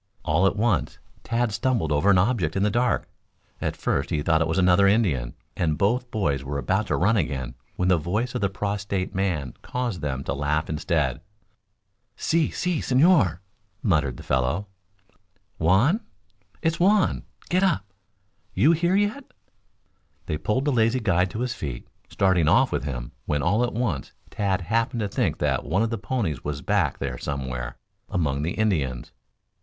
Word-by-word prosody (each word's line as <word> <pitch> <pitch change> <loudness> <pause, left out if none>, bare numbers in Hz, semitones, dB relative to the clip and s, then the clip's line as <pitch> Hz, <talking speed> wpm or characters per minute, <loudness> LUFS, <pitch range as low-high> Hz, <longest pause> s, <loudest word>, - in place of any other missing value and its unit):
All 80 +6 +3
at 95 - 0
once 110 -1 0 0.3
Tad 120 0 0
stumbled 110 - 0
over 75 +7 +3
an 100 - +6
object 90 -5 +1
in 95 - +1
the 105 - +2
dark. 120 +2 +1 0.5
At - - -2
first - - -1
he 75 - -1
thought 80 0 +3
it 80 - +2
was 80 - -1
another 95 +1 +5
Indian, 85 - +1 0.2
and 80 -3 0
both 120 +5 +1
boys 75 - -1
were 70 +1 -3
about 95 +9 0
to - - +1
run 105 +5 +3
again, 65 - -2 0.2
when 90 - 0
the 90 -2 +4
voice 105 +10 -2
of - - -2
the 100 - +2
prostrate 100 -1 -3
man 90 -9 -1
caused 120 -9 -3
them 70 -2 -3
to - - -2
laugh 75 +3 -1
instead. 75 -4 0 0.9
"Si, 165 -1 +1
si, 180 -4 -1
señor," 130 - +3 0.4
muttered 75 - +1
the - - -10
fellow. 65 +10 0 0.9
"Juan? 105 - +3 0.6
It's 165 0 +1
Juan! 200 +2 +3 0.3
Get 180 +1 +3
up! 185 - +2 0.7
You 155 - +5
here 170 +3 +2
yet?" 205 +7 +1 1.0
They 75 - -3
pulled 130 - 0
the 145 - +2
lazy 115 0 +2
guide 95 -5 +2
to 110 - -5
his 125 -1 -1
feet, 65 -5 -6 0.2
starting 95 -5 +2
off - - +4
with - - -2
him, 60 -4 -5 0.2
when 75 -1 0
all 105 +7 +2
at 120 - -1
once 105 - -2 0.2
Tad 100 -2 0
happened 115 +6 0
to 105 - 0
think - - -1
that 70 -3 0
one 95 +7 +1
of 115 - -1
the 115 - -2
ponies 100 - -2
was 75 0 -4
back - - +1
there - - -4
somewhere 65 -4 -4 0.3
among 70 -6 0
the 80 +4 -1
Indians. 75 - -1
95 Hz, 170 wpm, -25 LUFS, 75-115 Hz, 1.0 s, an